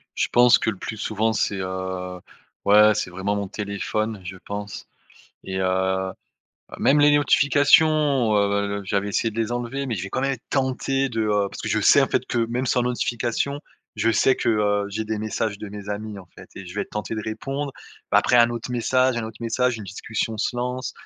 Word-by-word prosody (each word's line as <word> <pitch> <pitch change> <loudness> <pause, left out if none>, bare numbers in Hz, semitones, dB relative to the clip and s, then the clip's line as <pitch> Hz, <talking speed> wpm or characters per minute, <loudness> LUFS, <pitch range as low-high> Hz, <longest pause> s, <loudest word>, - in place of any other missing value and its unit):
Je - - 0
pense 120 0 +6
que, 110 - 0
le 95 - -7
plus 110 - -6
souvent, 110 +1 0
c'est, 100 -2 -1
heu, 95 -1 -4 0.4
ouais, 105 +1 +6
c'est 90 - -2
vraiment 95 +3 -2
mon 100 -1 -3
téléphone, 105 +1 -3
je 95 0 -7
pense 100 0 -6 0.6
et 95 0 -3
heu, 95 0 0 0.7
même 145 +2 +4
les 145 0 +6
notifications, 145 -4 +4
heu, 100 0 0
j'avais 100 +1 -1
essayé 115 +3 0
de 110 - -8
les 115 +1 -1
enlever 120 +3 -3
mais 120 - -2
je 90 - -4
vais 100 - -6
quand - - -1
même 135 0 +1
être 120 - -8
tenté 135 0 0
de, 115 -2 -2
heu, 105 -2 +1
parce - - -9
que - - -3
je - - +1
sais, - - +6
en - - +2
fait, - - -1
que 120 - -2
même 125 +2 -2
sans 125 0 +2
notifications, 125 +3 -1 0.4
je 115 +2 +2
sais 130 +4 +3
que, 120 - -1
heu, 105 -2 +1
j'ai 110 +2 -3
des 110 -1 -2
messages 110 0 -2
de 105 - -7
mes 105 0 -9
amis, 105 0 -5
en 90 - -12
fait - - -13
et 95 - -8
je 90 - -9
vais 105 - -1
être - - -12
tenté 105 +1 -4
de 110 - -4
répondre, 135 +5 -4 0.4
bah, - - +7
après 125 - +3
un 120 0 +6
autre 120 +1 -5
message, 130 +1 +2
un 115 - -2
autre 110 +1 -9
message, 120 +1 0
une 105 - -7
discussion 110 +3 -4
se 120 - -1
lance 125 +1 -3
110 Hz, 215 wpm, -23 LUFS, 100-125 Hz, 0.7 s, bah